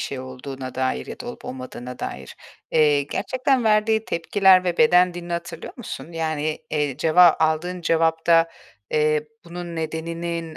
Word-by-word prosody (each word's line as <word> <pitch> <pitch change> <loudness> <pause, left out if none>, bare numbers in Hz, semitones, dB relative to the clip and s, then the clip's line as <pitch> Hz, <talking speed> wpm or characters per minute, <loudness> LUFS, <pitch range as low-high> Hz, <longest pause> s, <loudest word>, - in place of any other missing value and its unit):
şey 135 - -4
olduğuna 130 0 -8
dair 130 - -1
ya - - -9
da - - -7
olup - - -8
olmadığına 125 -1 -7
dair, 65 -1 -7 0.3
eee, 150 -2 +4
gerçekten 255 - 0
verdiği 220 +1 +3
tepkiler 185 +1 +3
ve 175 -1 -1
beden 180 -6 +5
dilini 175 0 -6
hatırlıyor 170 -1 -5
musun? 195 -7 -8
Yani, 155 -2 -2
eee, 145 -4 -1
ceva 165 +2 +5
aldığın 165 +3 0
cevapta, 165 0 +3 0.4
eee, 150 0 +1 0.2
bunun 170 0 -7
nedeninin 165 +1 -4
165 Hz, 140 wpm, -23 LUFS, 150-175 Hz, 0.4 s, beden